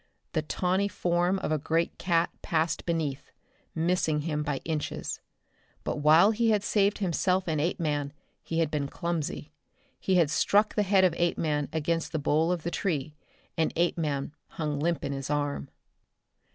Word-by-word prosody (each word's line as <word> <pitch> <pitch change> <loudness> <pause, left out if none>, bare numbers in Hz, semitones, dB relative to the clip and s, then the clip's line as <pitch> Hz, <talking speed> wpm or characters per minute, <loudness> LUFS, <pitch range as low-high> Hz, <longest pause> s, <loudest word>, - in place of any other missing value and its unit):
The 155 - +1
tawny 185 +5 0
form 175 -1 +1
of 185 - -3
a 155 - +1
great 165 +3 -1
cat 170 -2 +2
passed 160 0 -1
beneath, 145 -5 -2 0.5
missing 160 -2 +1
him 150 -1 -2
by 145 -2 -1
inches. 155 -2 -3 0.6
But - - -2
while 155 +7 +6
he 225 +1 +1
had 210 -2 +2
saved 205 -1 +2
himself 185 0 +1
and 155 -3 0
Apeman, 150 -4 -1 0.3
he 165 - -4
had 160 -2 0
been 145 -2 -1
clumsy. 160 -1 -3 0.5
He 190 - +1
had 165 -5 +4
struck 205 +6 +3
the 210 - +1
head 195 -1 +4
of 180 -3 +4
Apeman 155 -4 0
against 165 +2 -1
the - - +1
bole 155 +3 +2
of 175 -3 -2
the 170 - -2
tree, 155 -7 -2 0.4
and 160 - +1
Apeman 155 -5 0 0.2
hung 150 -3 -3
limp 170 +2 0
in - - -2
his 135 0 -4
arm. 145 - -1
165 Hz, 165 wpm, -28 LUFS, 150-180 Hz, 0.6 s, while